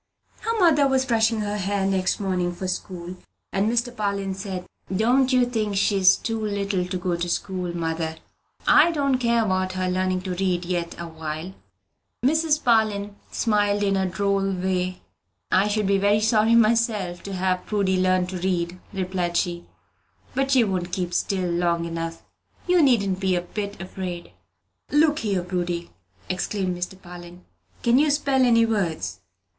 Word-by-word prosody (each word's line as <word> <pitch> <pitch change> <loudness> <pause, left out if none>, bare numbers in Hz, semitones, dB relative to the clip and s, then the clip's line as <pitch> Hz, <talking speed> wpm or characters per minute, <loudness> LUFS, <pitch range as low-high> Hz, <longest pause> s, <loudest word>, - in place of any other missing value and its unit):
Her 455 0 -2
mother 305 -6 +5
was 265 -1 +2
brushing 225 -2 +2
her 210 0 -2
hair 200 0 -1
next 190 -1 0
morning 185 -3 -1
for 185 +2 -4
school, 180 -1 -5 0.4
and 200 +3 +1
Mr. 240 +1 0
Parlin 200 -2 -2
said, 190 -2 -5 0.3
"Don't 245 +7 +3
you 255 -1 +4
think 220 -4 -2
she's 195 -2 +4
too 225 -1 -3
little 200 -3 -1
to 185 0 -3
go 180 -1 -1
to 175 +1 -3
school, 180 -1 -3
mother? 160 -1 -2 0.5
I 310 +3 +7
don't 280 -5 +1
care 235 -2 +2
about 185 -1 0
her 185 0 -1
learning 185 0 0
to 185 -1 -3
read 180 -1 -1
yet 175 -1 -2
awhile." 160 +1 -6 0.7
Mrs. 310 +1 +2
Parlin 210 -3 +2
smiled 205 -2 +1
in 195 -1 +2
a 190 -1 +1
droll 195 +1 0
way. 185 0 -2 0.5
"I 190 +2 +4
should 210 0 0
be 195 0 +2
very 205 +2 +3
sorry 220 +1 +3
myself 215 -5 +2
to 200 - -7
have 185 -1 -1
Prudy 195 -3 +1
learn 185 -1 +2
to 180 0 -5
read," 175 -1 -1
replied 185 -3 -2
she; 175 -2 -1 0.7
"but 270 +1 0
she 260 -3 +5
won't 185 -4 -2
keep 180 -2 -2
still 185 -1 0
long 170 -1 0
enough: 165 0 -5 0.4
you 360 -1 +4
needn't 200 -9 +3
be 190 -2 +1
a 175 - 0
bit 200 +3 -5
afraid." 185 -2 -6 0.6
"Look 300 +1 +3
here, 195 -5 -1
Prudy," 175 -1 -3 0.4
exclaimed 185 0 -2
Mr. 180 +2 -5
Parlin, 175 0 -11 0.4
"can 240 +2 +4
you 300 +1 +3
spell 280 -2 +2
any 230 -2 +5
words?" 195 -8 -2
195 Hz, 160 wpm, -24 LUFS, 180-220 Hz, 0.7 s, I